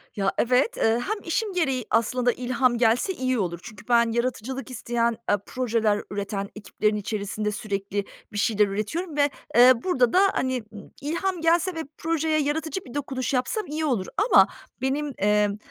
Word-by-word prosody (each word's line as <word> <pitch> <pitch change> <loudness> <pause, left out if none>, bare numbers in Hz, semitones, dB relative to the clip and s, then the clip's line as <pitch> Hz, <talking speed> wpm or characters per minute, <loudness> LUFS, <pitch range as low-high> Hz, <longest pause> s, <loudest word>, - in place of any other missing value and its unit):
Ya, 195 -1 +1
evet, 255 - +2
eee, 225 +1 +2
hem 430 0 -1
işim 395 +4 -1
gereği 270 -9 0
aslında 245 +2 +2
ilham 250 0 +1
gelse 240 - +2
iyi 255 -5 -1
olur. 170 -3 -2
Çünkü 210 -3 -12
ben 235 -1 +4
yaratıcılık 255 +3 -2
isteyen 235 -1 0 0.2
e 205 - +4
projeler 225 -4 0
üreten 200 0 -3
ekiplerin 210 0 -1
içerisinde 210 0 -3
sürekli 200 -1 -3 0.3
bir 205 - -6
şeyler 210 -1 +3
üretiyorum 290 - -3
ve, 285 0 +4 0.3
eee, 250 +2 +9
burada 255 -10 +2
da, 370 - +6
hani, 260 -3 -1
ımm, 205 - -11
ilham 340 +4 -2
gelse 340 +2 +2
ve 325 - -3
projeye 320 -1 0
yaratıcı 315 +5 -2
bir 245 - -11
dokunuş 270 -3 -3
yapsam 265 - 0
iyi 310 +1 -2
olur 230 -10 0 0.2
ama - - +8 0.3
benim, 280 +2 -1
emm, 210 0 +2
250 Hz, 165 wpm, -25 LUFS, 210-295 Hz, 0.3 s, eee